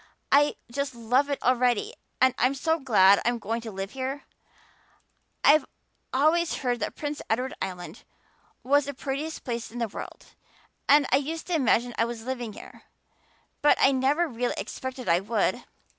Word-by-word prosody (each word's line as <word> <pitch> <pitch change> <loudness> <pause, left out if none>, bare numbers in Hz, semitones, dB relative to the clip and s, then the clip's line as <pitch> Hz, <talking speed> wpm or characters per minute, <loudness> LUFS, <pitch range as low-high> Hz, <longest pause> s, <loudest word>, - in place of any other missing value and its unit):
I 290 +1 +4 0.2
just 280 0 -3
love 250 +5 +1
it 280 - 0
already, 255 - +2 0.3
and 260 -1 +5
I'm 255 +3 +2
so 320 +4 0
glad 200 -7 +5
I'm 240 +1 +1
going 225 +1 -3
to 225 -1 -7
live 195 0 -5
here. 270 +1 -4 1.2
I've 300 0 +6 0.5
always 320 +5 +2
heard 245 -3 -1
that - - -3
Prince 295 0 -4
Edward 250 +4 0
Island 180 -2 -6 0.6
was 285 +2 +3
the 285 -1 -5
prettiest 285 +4 -4
place 235 -2 -4
in 240 - -10
the 235 -1 -1
world, 205 - -9 0.6
and 290 0 +6
I 265 - +6
used 315 +4 -4
to 360 - -4
imagine 245 -5 +2
I 230 - +4
was 235 -1 -6
living 245 -4 -4
here, - - -13 0.8
but 295 - +5
I 270 - +5
never 275 +6 +2
really 245 -3 -2
expected 260 -1 -6
I 170 +1 +4
would. 220 +4 -1
260 Hz, 165 wpm, -26 LUFS, 235-285 Hz, 1.2 s, I've